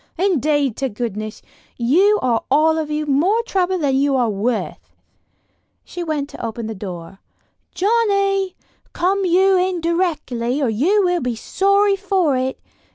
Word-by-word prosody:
Indeed 300 - +1
to 270 -1 -1
goodness, 215 -1 -5 0.3
you 360 - +3
are 240 -3 +1
all 315 +3 +3
of 310 -1 -3
you 300 0 -2
more 345 +11 +2
trouble 375 -4 0
than 285 -5 0
you 275 0 +2
are 240 -4 +1
worth." 220 +4 -3 0.9
She 350 - -6
went 300 -3 -3
to - - -11
the - - -9
open 225 0 -6
door: 185 -1 -8 0.6
"Johnnie! 395 -2 +1 0.4
Come 380 +3 0
you 375 +2 +4
in 365 -1 0
directly, 310 -8 -1
or 270 -5 +1
you 345 - +2
will 355 -1 +1
be 250 -2 -2
sorry 395 - +2
for 380 -7 0
it. 260 +1 -2
310 Hz, 150 wpm, -19 LUFS, 250-380 Hz, 0.9 s, you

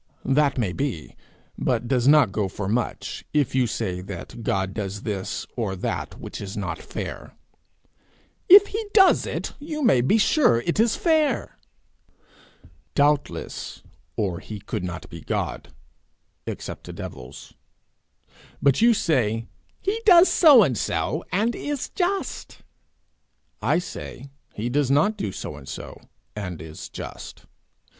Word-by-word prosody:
'That 140 +1 +2
may 105 -8 0
be 130 - -4 0.4
but 120 - 0
does 125 -1 +1
not 145 -7 +6
go 100 0 -1
for 95 +1 -5
much, 115 +4 -2
if 145 -5 +2
you 130 -2 +2
say 95 -5 -3
that 95 +4 -8
God 95 -3 -1
does 100 -1 -4
this 100 -4 -3
or 110 -6 -2
that 90 - -4
which - - -7
is 100 0 -6
not 90 -5 -3
fair.' - - -7 1.1
'If 400 +2 +10
he 435 +2 -3
does 385 -3 +6
it, - - -4
you 300 0 -4
may 190 - +5
be 135 - +3
sure 225 - +4
it 170 - -1
is 225 0 +3
fair.' 310 -6 +1 1.4
'Doubtless, 145 0 0 0.3
or 95 -5 -1
he 105 +1 -8
could 90 - -4
not 90 -1 -5
be 85 -1 -10
God - - -3 0.8
except - - -6
to - - -8
devils. 65 +2 -9 1.1
But 140 +4 +3
you 235 0 +6
say 115 - +1 0.3
he 420 +4 -2
does 365 -4 +7
so 290 - +7
and 135 -8 +1
so, 90 - -1
and 220 +5 +1
is 290 -2 -3
just; 380 +2 -3 1.0
I - - +2
say, 140 -6 -7 0.2
he 110 +3 -3
does 135 +2 +1
not 155 +11 +3
do 105 - -3
so 75 -5 -6
and 70 -2 -11
so, - - -8 0.3
and 90 -6 -5
is 80 0 -9
just. - - -9
125 Hz, 140 wpm, -24 LUFS, -, 1.4 s, If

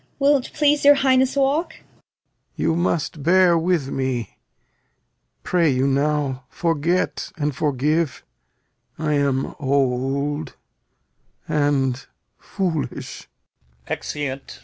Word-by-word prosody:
Cor. 280 +1 +4
Will't 275 -3 +1
please 295 -1 +2
your 285 0 +8
Highness 265 -1 +2
walk? 290 +5 +1
Lear. - - -18 0.7
You 165 - 0
must 170 -3 -1
bear 175 +3 +4
with 165 -4 0
me. 130 -5 -3 1.1
Pray 170 -3 +2
you 130 -1 +1
now, 140 -1 0
forget 170 +1 -1
and 150 -3 -1
forgive. 150 +2 0 0.7
I 155 -1 -1
am 140 -2 0
old 140 +2 -1 0.9
and 140 -3 +1 0.4
foolish. 175 -7 -4 0.6
Exeunt. 135 - -5
150 Hz, 100 wpm, -22 LUFS, 135-180 Hz, 1.1 s, your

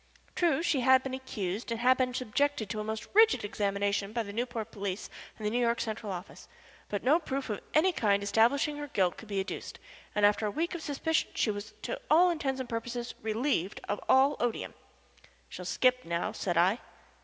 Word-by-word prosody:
True, 330 -3 +2
she 330 -5 +2
had 260 +1 +5
been 265 - -4
accused, 220 -6 -4
and 230 -1 -2
had 255 +2 +5
been 255 -1 0
subjected 255 -2 -1
to 215 - -3
a - - -2
most 220 +1 -4
rigid 440 - +5
examination 200 0 -1
by 230 -1 0
the 200 -1 -8
Newport 230 -1 -3
police 200 -2 -4 0.3
and 215 - -7
the 210 - +1
New 240 - +1
York 235 -1 +2
Central 220 -2 -3
Office, 180 +1 -8 0.4
but 205 - -3
no 290 +7 +5
proof 270 -6 -3
of 205 - -4
any 345 +5 +5
kind 200 -7 +2
establishing 240 +9 +2
her 295 0 -5
guilt 185 -9 +1
could 225 - -12
be 200 -2 -2
adduced, 190 - -5 0.4
and 210 -1 +4
after 210 +1 +3
a - - 0
week 325 +10 -2
of 345 - -5
suspicion 310 +2 0
she 215 - +2
was 205 +1 -7
to - - -4
all 355 +3 +6
intents 270 -5 -2
and 260 - -4
purposes 240 +1 -4
relieved 220 - -1
of 205 - -1
all 275 +2 +5
odium. 240 -2 -2 0.8
"She'll 180 - -8
skip 250 +8 +2
now," 170 +1 -2
said 175 -3 -2
I. 185 +7 +4
230 Hz, 200 wpm, -30 LUFS, 205-270 Hz, 0.8 s, all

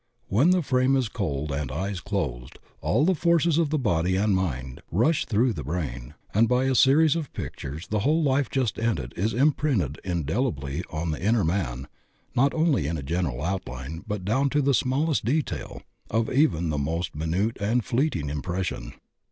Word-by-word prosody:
When 125 - +4
the 180 -1 +3
frame 130 0 +2
is 130 -3 +1
cold 75 -9 -3
and 70 -2 -3
eyes 95 +6 -3
closed, 65 -12 -3 0.2
all 135 +8 +2
the 190 - +4
forces 170 -1 +2
of 160 -3 +2
the 155 - +1
body 90 - +1
and 100 +1 +2
mind 65 -9 -3
rush 120 - +2
through 115 +3 +2
the 75 - -5
brain, 75 -3 -4 0.2
and 110 +3 +4
by 125 +1 +3
a 135 0 +2
series 145 +5 +5
of 160 -4 -3
pictures 75 +4 -6
the 105 - 0
whole 155 +9 +2
life 140 -1 +2
just 130 -6 -1
ended 110 - -1
is 105 +5 0
imprinted 130 - +1
indelibly 85 - -2
on 80 +1 -2
the 75 - -4
inner 110 +2 +2
man 75 -7 -1 0.5
not 140 +3 +4
only 155 - +2
in 80 +1 -2
a 70 - -5
general 75 -4 -2
outline 80 -4 -4
but 105 -4 -4
down 130 +7 +2
to 145 +1 +1
the 140 +1 +3
smallest 140 +5 +1
detail 145 +7 -2 0.3
of 115 +1 0
even 125 - +2
the 75 -1 -1
most 80 +4 -2
minute 85 +9 -1
and 115 +3 +1
fleet 135 +5 +1
ing 75 -3 -3
impression. 90 +6 -3
100 Hz, 185 wpm, -26 LUFS, -, 0.5 s, series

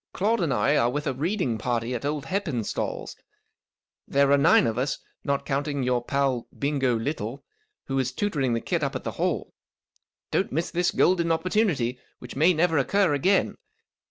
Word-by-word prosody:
" - - -64
Claude 215 +3 +1
and 165 -5 0
I 105 -5 +2
are 120 - +3
with 145 +4 -3
a 135 - 0
reading 145 - -1
party 120 0 -1
at 120 +2 -4
old 145 -1 -2
HeppenstalTs. 155 - -3 0.9
There 140 0 +3
are 140 - +6
nine 145 -2 +5
of 115 +1 -1
us, 140 +3 -1 0.3
not 140 -2 -1
counting 140 0 -1
your 125 -1 +1
pal 135 -2 0
Bingo 140 -3 +1
Little, 120 0 -4 0.4
who 135 0 -1
is 130 -1 0
tutoring 140 -7 -1
the 115 - -1
kid - - -1
up - - -2
at - - -4
the - - -3
Hall. - - -2 0.8
"Don't - - 0
miss 165 +5 -1
this 175 +1 +1
golden 170 -2 +2
opportunity, 165 - 0 0.2
which 125 - -10
may 160 +6 +5
never 165 -2 +2
occur 190 +4 +2
again. 185 +8 +2
140 Hz, 180 wpm, -26 LUFS, 125-165 Hz, 0.9 s, are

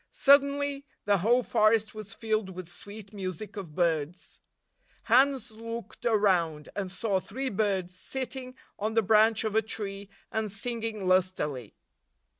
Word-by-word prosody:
Suddenly, 280 0 +3 0.2
the 200 -1 +3
whole 240 +7 +3
forest 215 -1 +3
was 215 -2 -8
filled 215 -3 -1
with 185 -2 -8
sweet 200 +4 -11
music 195 +1 -5
of 180 -7 -7
birds. 170 0 -1 0.6
Hans 255 0 +3
looked 230 +2 -6
around, 180 -9 +2
and 195 -3 -3
saw 195 0 0
three 260 +8 -4
birds 190 -4 -1
sitting 260 -1 -5 0.2
on 215 +2 -2
the 225 - +4
branch 220 +2 +4
of 220 -2 -1
a 220 - +4
tree 200 -2 -4 0.2
and 220 -2 -1
singing 225 -1 -4
lustily. 180 - 0
215 Hz, 135 wpm, -29 LUFS, 185-230 Hz, 0.6 s, the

